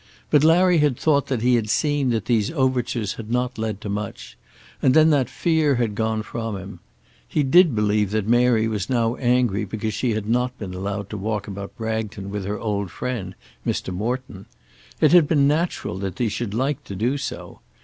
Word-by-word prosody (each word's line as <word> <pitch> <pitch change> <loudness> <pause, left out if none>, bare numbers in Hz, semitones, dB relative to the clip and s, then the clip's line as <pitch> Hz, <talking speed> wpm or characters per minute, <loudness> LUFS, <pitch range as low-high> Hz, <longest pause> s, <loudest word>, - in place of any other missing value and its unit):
But 150 -1 +5
Larry 175 +2 +5
had 145 -5 +2
thought 145 -3 +2
that 125 -5 -2
he 125 0 +4
had 115 -3 +1
seen 145 +1 +1
that 115 -2 -1
these 110 -3 +1
overtures 125 -7 0
had 110 -1 -8
not 125 0 -1
led 110 -3 -2
to - - -6
much, 100 -12 -5 0.5
and 130 - +3
then 160 0 +6
that 135 -5 +2
fear 160 -4 +1
had 120 -3 0
gone 110 0 -1
from 115 -1 -4
him. 95 -1 -9 0.5
He 150 - 0
did 160 0 +5
believe 105 -1 +1
that 105 0 -1
Mary 120 -1 +3
was 105 -1 -3
now 115 -3 +1
angry 120 -5 +1
because 110 +2 -3
she 115 +2 0
had 105 -1 -3
not 125 +2 0
been 95 -5 -6
allowed 100 +1 -4
to 105 - -4
walk 105 0 -3
about 100 0 -7
Bragton 110 -3 -4
with 100 -2 -4
her 105 +1 -2
old 100 -3 -2
friend 105 -4 -4 0.3
Mr. 95 - -2
Morton. 115 0 -4 0.5
It 155 - +4
had 170 -4 +6
been 140 -3 +3
natural 150 - -1
that 95 -2 -4
she 120 -3 0
should 105 -1 -4
like 135 +4 -1
to 100 - -7
do 120 +8 0
so. - - -6
115 Hz, 200 wpm, -23 LUFS, 105-130 Hz, 0.5 s, then